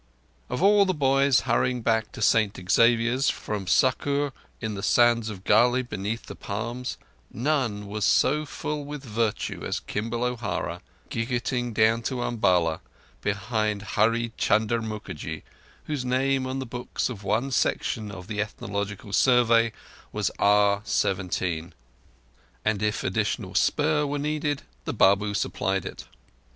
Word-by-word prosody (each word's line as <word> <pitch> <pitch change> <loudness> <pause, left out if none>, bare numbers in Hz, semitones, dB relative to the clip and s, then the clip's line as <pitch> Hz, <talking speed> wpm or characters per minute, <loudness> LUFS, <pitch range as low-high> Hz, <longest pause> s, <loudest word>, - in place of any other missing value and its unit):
Of 125 +8 -2
all 200 0 +6
the 185 - 0
boys 135 -1 +3
hurrying 125 -2 0
back 110 -1 +1
to 115 - -4
St 110 -1 +3
Xavier's, 120 +4 +4
from 105 -3 -4
Sukkur 140 +6 +2 0.3
in 110 -2 -3
the 100 - -5
sands 115 +2 +3
to 110 - -4
Galle 120 +6 +3
beneath 105 -1 -4
the - - -8
palms, 120 +5 -4 0.3
none 120 -5 -1
was 105 +1 -4
so 150 +3 +3
filled 150 0 -4
with 145 -1 -6
virtue 115 -3 -2
as - - -2
Kimball 115 +3 -3
O'Hara, 120 -4 -2 0.3
jiggeting 120 +1 -1
down 110 +1 +3
to 125 +1 -2
Umballa 90 -8 +2 0.4
behind 105 0 -1
Hurree 115 +2 +2
Chunder 110 +2 +2
Mookerjee, 105 -8 -6 0.4
whose 150 -4 -3
name 130 +1 +1
on 130 +1 -3
the 135 - -3
books 120 +1 -3
of 110 -6 -7
one 110 +7 0
section 110 -4 0
of 90 -2 -9
the 105 +1 -2
Ethnological 100 -1 -5
Survey 115 -1 +4 0.4
was - - -1
R.17. 95 -4 +1 0.9
And 110 -2 +1
if 105 0 0
additional - - -1
spur 150 0 +2
were 145 +1 -2
needed, 150 0 -1 0.2
the - - -2
Babu 100 +2 +3
supplied 95 -1 -1
it. - - -8
115 Hz, 135 wpm, -26 LUFS, 105-130 Hz, 0.9 s, all